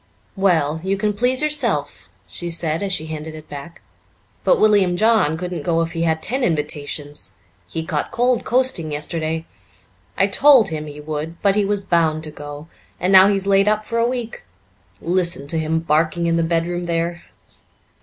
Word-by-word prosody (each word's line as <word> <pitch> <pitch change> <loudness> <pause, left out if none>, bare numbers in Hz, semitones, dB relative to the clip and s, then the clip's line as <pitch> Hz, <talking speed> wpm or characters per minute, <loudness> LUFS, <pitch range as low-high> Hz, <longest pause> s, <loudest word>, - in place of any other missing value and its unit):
"Well, 160 -6 +1
you 195 +1 0
can 210 +1 0
please 250 +6 +1
yourself," 150 - -1 0.2
she 175 - -6
said 165 -1 -1
as 200 -1 -1
she 160 -4 -1
handed 155 0 -6
it 155 -1 -11
back, 145 +4 -10 0.6
"but - - +3
William 195 -4 +3
John 215 -7 +3
couldn't 180 0 -4
go 165 -2 0
if 165 - -5
he 165 -1 -4
had 160 -1 0
ten 260 +2 -1
invitations. 145 - -3 0.4
He 160 - -4
caught 150 -2 -2
cold 245 0 +1
coasting 245 -11 0
yesterday. 160 +2 -3 0.7
I - - +4
told 265 -8 +5
him 155 -1 -5
he 150 0 -9
would, 155 +2 -5
but 200 -1 +4
he 205 0 +1
was 205 0 -1
bound 160 -4 +1
to 155 - -6
go, 145 +1 -9 0.3
and 185 +2 +1
now 190 0 +9
he's 195 -1 0
laid 195 0 +3
up 215 0 0
for 230 - -2
a 230 - +3
week. 240 -3 -5 0.6
Listen 175 -4 0
to 160 - 0
him 160 +1 0
barking 160 +1 +1
in 170 0 +1
the 165 - +2
bedroom 170 +1 -1
there." 170 +1 -2
170 Hz, 180 wpm, -20 LUFS, 155-200 Hz, 0.7 s, now